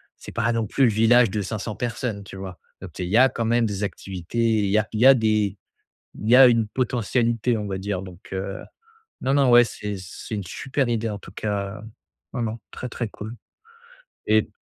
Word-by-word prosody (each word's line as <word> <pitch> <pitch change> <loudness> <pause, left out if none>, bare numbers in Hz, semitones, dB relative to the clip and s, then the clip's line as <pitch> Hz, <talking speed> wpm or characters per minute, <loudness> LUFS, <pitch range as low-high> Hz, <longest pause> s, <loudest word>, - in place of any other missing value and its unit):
c'est - - -11
pas 115 - 0
non 115 -1 0
plus 135 - +1
le 120 - +3
village 115 +2 +5
de 105 - -1
500 105 +2 -4
personnes, 115 -3 -3
tu 95 0 -10
vois? 95 -2 -7 0.2
Donc, - - -10
il 90 - -2
y 105 - +3
a 130 +2 +7
quand 115 - -3
même 120 +1 +2
des 100 -2 -3
activités. 95 0 -6 0.3
Il 100 - 0
y 100 - +3
a 110 0 +1
il 110 - -2
y - - +6
a 135 - +10
des 110 -4 +1 0.6
il 110 - -3
y 125 - +8
a 135 0 +10
une 115 -2 +2
potentialité, 120 0 0
on 105 - -4
va 95 -1 -3
dire 95 -1 -3
donc 95 -1 -12
heu, 95 +1 -4 0.6
non, 135 +1 +1
non, 140 -3 +4
ouais, 120 0 +8
c'est 105 -3 -5
c'est 95 +4 -7
une 100 - -4
super 135 - -2
idée, 115 -1 0
en 105 - -5
tout 95 - -13
cas, 100 0 -3 0.5
vraiment 115 -2 -3
très, 125 - -6
très 120 -1 -4
cool 110 +2 -8 1.0
et 110 0 +4
110 Hz, 215 wpm, -24 LUFS, 100-120 Hz, 1.0 s, a